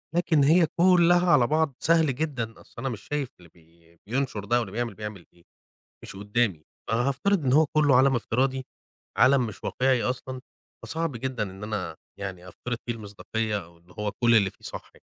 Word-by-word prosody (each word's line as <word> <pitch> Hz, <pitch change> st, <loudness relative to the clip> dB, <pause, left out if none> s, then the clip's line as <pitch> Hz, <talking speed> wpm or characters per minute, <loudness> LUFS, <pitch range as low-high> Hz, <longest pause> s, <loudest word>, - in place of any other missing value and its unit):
لكن 165 Hz, -4 st, +3 dB
هي 165 Hz, +4 st, +5 dB
كلّها 175 Hz, 0 st, +5 dB
على 125 Hz, -7 st, +5 dB
بعض 155 Hz, -2 st, +1 dB
سهل 160 Hz, -5 st, +3 dB
جدًا، 130 Hz, -7 st, -3 dB
أصل -, -, -21 dB
أنا 135 Hz, +2 st, -2 dB
مش 115 Hz, -5 st, -6 dB
شايف 145 Hz, -3 st, -3 dB
اللي 85 Hz, -1 st, -17 dB
بي 85 Hz, 0 st, -25 dB
بينشر 125 Hz, -5 st, -2 dB
ده 120 Hz, +4 st, +2 dB
واللي 110 Hz, -6 st, -4 dB
بيعمل 120 Hz, +2 st, -2 dB
بيعمل 105 Hz, -4 st, -7 dB
إيه، 85 Hz, -, -24 dB, 0.6 s
مش -, -, -9 dB
قدامي، 105 Hz, -5 st, -1 dB, 0.3 s
فهافترض 140 Hz, -, +1 dB
إن 130 Hz, -, +2 dB
هو 155 Hz, +3 st, +5 dB
كلّه 145 Hz, -2 st, +3 dB
عالم 130 Hz, 0 st, +4 dB
افتراضي، 130 Hz, +3 st, -1 dB, 0.5 s
عالم 135 Hz, -2 st, +5 dB
مش 110 Hz, -, -9 dB
واقعي 130 Hz, -2 st, +1 dB
أصلًا، 130 Hz, 0 st, -3 dB, 0.4 s
فصعب 165 Hz, -1 st, -2 dB
جدًا 125 Hz, -1 st, -3 dB
إن 95 Hz, -1 st, -6 dB
أنا 95 Hz, -7 st, -4 dB, 0.2 s
يعني 90 Hz, -2 st, -6 dB
أفترض 120 Hz, +6 st, -5 dB
فيه 120 Hz, -, 0 dB
المصداقية، 105 Hz, -1 st, -4 dB
أو 85 Hz, +1 st, -19 dB
اللي 85 Hz, +2 st, -22 dB
هو 105 Hz, -1 st, -2 dB
كل 120 Hz, -1 st, +5 dB
اللي 100 Hz, -3 st, +3 dB
فيه -, -, -24 dB
صح -, -, -8 dB
يعني. -, -, -21 dB
120 Hz, 185 wpm, -26 LUFS, 105-140 Hz, 0.6 s, هي